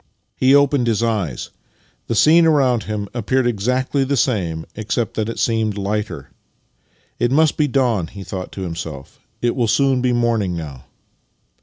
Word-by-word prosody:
He 130 +2 +4
opened 140 -3 +3
his 115 0 +1
eyes. 100 - -2 0.6
The 115 - -1
scene 165 +7 +5
around 130 -8 +2
him 105 -1 -3
appeared 125 +2 0
exactly 125 +5 0
the 140 +1 -1
same, 85 -11 0
except 110 +1 -2
that 110 0 -2
it 115 - -5
seemed 110 -3 0
lighter. 105 +1 -3 0.4
" - - -40
It 120 - +2
must 155 +3 +3
be 150 - +1
the 130 - -9
dawn," 120 -10 +1
he 100 +2 -10
thought 95 0 -6
to 95 - -6
himself. 80 -6 -7
" - - -43
It 120 - +1
will 120 -3 +1
soon 135 +2 +2
be 125 0 +1
morning 115 -7 0
now." 70 -6 -8
115 Hz, 175 wpm, -20 LUFS, 100-130 Hz, 0.6 s, scene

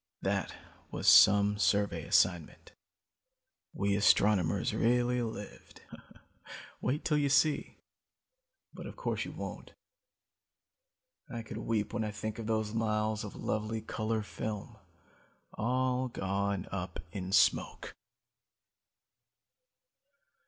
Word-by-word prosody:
"That - - -1 0.3
was - - -4
some 105 0 +7
survey 100 0 +1
assignment. - - +1 1.0
We 100 0 0
astronomers 100 -4 +3
really 125 +1 +2
lived. 110 -3 -8 1.0
Wait 135 +5 -1
till 150 -2 +2
you 140 -1 +1
see 145 +2 +2 1.0
but - - -8
of - - -9
course - - -2
you - - -7
won't. - - -8 1.6
I 115 -1 -5
could 110 - -7
weep 110 -3 -2
when 110 - -1
I 110 - -2
think 110 +1 -5
of 110 - -5
those 110 -1 -1
miles 110 -1 0
of 105 - -8
lovely 110 +1 -2
color 110 0 -2
film, 105 0 -6 0.8
all 125 +3 0
gone 100 -3 -2
up 95 -1 -5
in 95 -2 -5
smoke. 100 - +2
110 Hz, 105 wpm, -31 LUFS, 100-115 Hz, 1.6 s, some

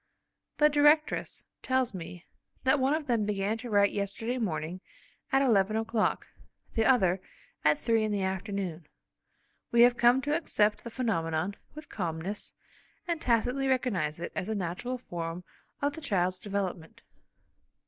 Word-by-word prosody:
The 300 - +6
directress 295 +1 +2 0.2
tells 260 -3 +1
me 175 -1 -8 0.4
that 270 +2 +4
one 270 +3 +2
of 310 -1 -3
them 235 -5 +1
began 205 +1 0
to 245 +1 -7
write 200 -1 +4
yesterday 210 +5 -3
morning 175 -3 -3 0.5
at 270 +1 +4
eleven 215 -4 +3
o'clock, 225 0 0 0.5
the 225 -1 +1
other, 190 -8 +3 0.4
at 150 0 +4
three 225 -1 +2
in 215 - -1
the 200 -2 0
afternoon. 190 -4 -3 0.8
We 235 - +5
have 245 0 +5
come 240 +2 +5
to 295 +1 +1
accept 215 -10 +1
the 235 - -6
phenomenon 195 -7 -1 0.2
with 305 -1 -10
calmness, 175 +1 -4 0.5
and 340 -2 -1
tacitly 250 +3 +1
recognise 195 -13 0
it 170 - -5
as 185 - -3
a 220 - -1
natural 195 +7 -3
form 170 -6 -5 0.4
of 285 0 +1
the 320 - -8
child's 185 - 0
development. 190 -5 -4
215 Hz, 150 wpm, -29 LUFS, 185-255 Hz, 0.8 s, The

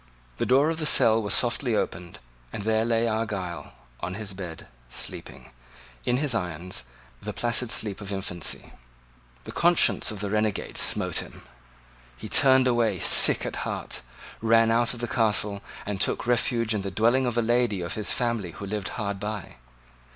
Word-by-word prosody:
The - - -1
door 140 +5 +4
of 165 - -4
the 155 - +1
cell 115 -5 +5
was 105 - -3
softly 120 -1 +1
opened; 85 -4 -3 0.3
and - - -5
there 110 +1 +1
lay 115 0 +1
Argyle, 105 -6 -4 0.3
on 90 +1 -4
the 105 0 -5
bed, 90 -4 -8 0.2
sleeping, 65 +1 -7 0.5
in 125 - +1
his 145 -1 0
irons, 90 - -3 0.4
the - - -5
placid 120 0 -1
sleep 105 -3 -1
of 100 0 -7
infancy. 90 -4 -4 0.7
The - - -8
conscience 175 0 +3
of 105 -3 -5
the 100 0 -3
renegade 105 -1 -1
smote - - +3
him. - - -5 0.7
He - - -8
turned 130 -2 +5
away 120 -5 +1
sick - - +6
at - - -4
heart, - - -4 0.4
ran 115 0 +4
out 120 +1 +2
of 120 - -8
the 120 - -2
Castle, 105 -3 0 0.2
and 100 -1 -4
took - - 0
refuge 115 -1 +1
in 105 - -1
the 100 - -4
dwelling 120 +7 +2
of 120 -1 -2
a 120 - +2
lady 120 -4 +1
of 85 - -4
his 105 -1 -1
family 115 -8 -1
who 95 +2 -8
lived 100 -1 -4
hard 100 -3 -3
by. 105 - -6
110 Hz, 175 wpm, -26 LUFS, 100-120 Hz, 0.7 s, sick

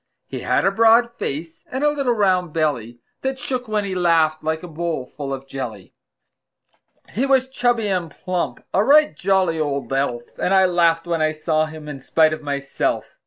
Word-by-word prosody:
He - - -6
had - - +1
a 195 - +4
broad 230 +3 +4
face, 160 +4 -5
and 265 +3 -2
a 295 - +4
little 275 -5 0
round 185 -6 +1
belly 120 -7 -1 0.2
That 265 0 -2
shook 250 -1 -4
when 210 -1 -1
he 195 - -3
laughed, 165 -3 +2
like 160 +1 -2
a - - -6
bowl 165 -4 -3
full 140 +1 -7
of 135 0 -5
jelly. 120 -8 -7 1.2
He 260 +6 0
was 265 -1 +3
chubby 245 -4 0
and 180 -4 -1
plump 180 +2 -4
a 195 - +3
right 300 +4 +5
jolly 185 -4 +1
old 140 -3 -2
elf; 125 -3 -2
And 195 - +2
I 190 0 +6
laughed 170 -2 +2
when 170 -2 -1
I 155 0 +2
saw 155 0 0
him 155 -1 -10
in 145 -2 -7
spite 155 +3 +3
of 155 - -5
myself. 140 -1 -3
170 Hz, 190 wpm, -21 LUFS, 150-210 Hz, 1.2 s, I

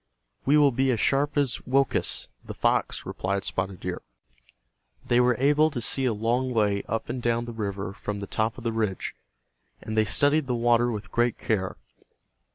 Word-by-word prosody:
"We 145 +2 +6
will 145 -2 +5
be 130 +2 +1
as 115 - 0
sharp 140 +4 +1
as 140 -4 +1
Woakus, 135 +1 +1 0.2
the - - -8
fox," - - 0
replied 100 +1 -2
Spotted 95 -1 -3
Deer. - - -4 1.0
They 120 - +3
were 125 0 +4
able 150 +4 +4
to 140 -5 -4
see 130 +3 +1
a 125 - +2
long 120 +4 0
way 105 -2 +2
up 115 +1 -2
and 125 - -4
down 120 0 +1
the 120 0 -7
river 100 -3 -4
from 100 0 -5
the 100 - -4
top 110 +3 -1
of 120 - -9
the 115 -1 -1
ridge, 105 -4 -2 0.7
and 110 - -6
they 110 0 +3
studied 145 +6 +2
the 125 - 0
water 120 0 +3
with 105 -5 -6
great 120 -1 +1
care. 95 -4 -1
120 Hz, 185 wpm, -26 LUFS, 105-130 Hz, 1.0 s, We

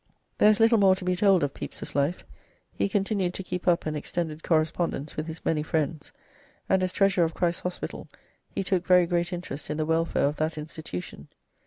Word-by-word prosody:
There 210 - +7
is 215 0 +3
little 225 0 +5
more 190 -2 +6
to 185 - -8
be 180 0 +1
told 195 -3 +4
of 145 - -1
Pepys's - - -6
life. 145 +5 0 0.5
He - - 0
continued 195 -2 0
to 190 - -4
keep 180 0 -5
up 175 -1 +3
an 155 - -1
extended 155 +1 -3
correspondence 160 -2 0
with 155 +1 -3
his 160 0 -8
many 155 -2 +1
friends, 155 -1 -2 0.6
and 190 -1 +3
as 185 0 0
Treasurer 195 -2 +3
of 160 - -4
Christ's 175 -1 0
Hospital 180 0 -5 0.4
he - - -3
took 185 -2 +1
very 180 -1 +6
great 175 +1 0
interest 175 -6 -6
in 150 - -2
the 155 - 0
welfare 165 0 +1
of 145 +1 -1
that 155 0 -1
institution. 150 - -7
170 Hz, 200 wpm, -27 LUFS, 155-185 Hz, 0.6 s, There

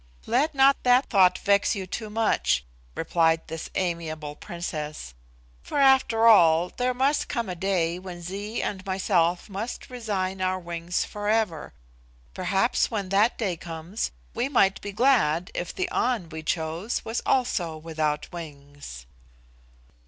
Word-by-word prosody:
"Let 280 +6 +1
not 275 +1 +5
that 250 +2 +3
thought 185 -4 +5
vex 200 +2 +2
you 195 -2 -4
too 215 +4 -5
much," 215 - +1 0.3
replied 165 0 +2
this 160 0 -6
amiable 160 -4 -3
Princess, 155 - -6 0.5
"for, - - -5
after 265 -5 +4
all, 175 -6 +6
there 250 +4 -1
must 275 +3 +1
come 235 -5 -2
a 185 - -3
day 175 -2 0
when 180 -2 -9
Zee 200 +5 -4
and 190 -2 -3
myself 185 -2 +1
must 215 +5 -6
resign 195 -6 -3
our 185 0 +1
wings 170 0 -3
forever. 210 -6 -1 0.6
Perhaps 190 +6 +1
when 205 -5 -3
that 205 +5 +3
day 195 -6 -1
comes 165 +4 -5 0.2
we 245 +4 -1
might 195 -8 +3
be 205 - -5
glad 200 - +2
if 175 - -3
the 375 - -2
An 235 -9 0
we 160 0 -6
chose 160 +7 -2
was 225 +2 -2
also 175 -11 0
without 155 -2 -2
wings." 145 - -9
185 Hz, 140 wpm, -26 LUFS, 165-225 Hz, 0.6 s, all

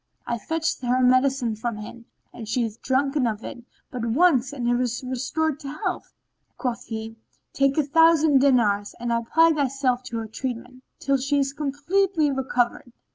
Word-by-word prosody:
I 235 - -2
fetched 320 +6 -2
her 250 0 +1
medicine 255 -2 +2
from 225 0 -4
him 230 +2 -10 0.3
and 225 -3 -9
she 235 +3 0
hath 225 -1 -6
drunken 275 0 +1
of 220 -1 -3
it 240 -3 -8 0.3
but 245 -2 -5
once 265 +1 +3
and 250 -4 -3
is 245 0 -2
restored 270 +4 -2
to 290 - -9 0.2
health." - - -3 0.5
Quoth 250 -1 -3
he, 225 0 -6 0.4
"Take 275 +1 +1
a 305 - +4
thousand 315 -1 +4
dinars 225 -7 +2
and 240 0 -3
apply 270 +9 +3
thyself 270 -3 0
to 235 -2 -5
her 225 -1 -4
treatment, 250 +2 -6 0.2
till 275 0 +1
she 275 +2 0
be - - +2
completely 305 +3 0
recovered." 250 -2 -1
255 Hz, 165 wpm, -24 LUFS, 235-285 Hz, 0.5 s, a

